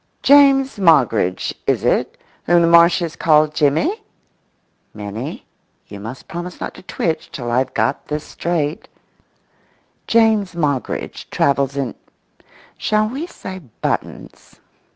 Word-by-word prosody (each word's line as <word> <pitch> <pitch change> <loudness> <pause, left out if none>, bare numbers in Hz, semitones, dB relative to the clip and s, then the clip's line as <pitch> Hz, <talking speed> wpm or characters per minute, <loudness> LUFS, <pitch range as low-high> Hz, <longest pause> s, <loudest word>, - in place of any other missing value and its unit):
James 275 -3 +5
Moggridge 125 - +2
is - - +1
it, - - 0 0.3
whom 175 0 +4
the - - +4
Marshes 170 0 +4
call 155 -2 +4
Jimmy? 155 - 0 0.9
[Minnie, 105 +7 -6 0.4
you 100 - -9
must 115 +6 -9
promise 175 +1 -7
not - - -5
to - - -13
twitch 165 -3 -3
till 120 -3 -5
I've 130 +2 0
got 115 +5 -1
this 150 0 -3
straight]. 160 -3 -3 1.2
James 220 -5 +2
Moggridge 145 -6 -3
travels 140 0 +1
in—shall 215 - -4
we 280 +8 -5
say 190 - -8 0.2
buttons? - - -5
160 Hz, 110 wpm, -19 LUFS, 135-190 Hz, 1.2 s, James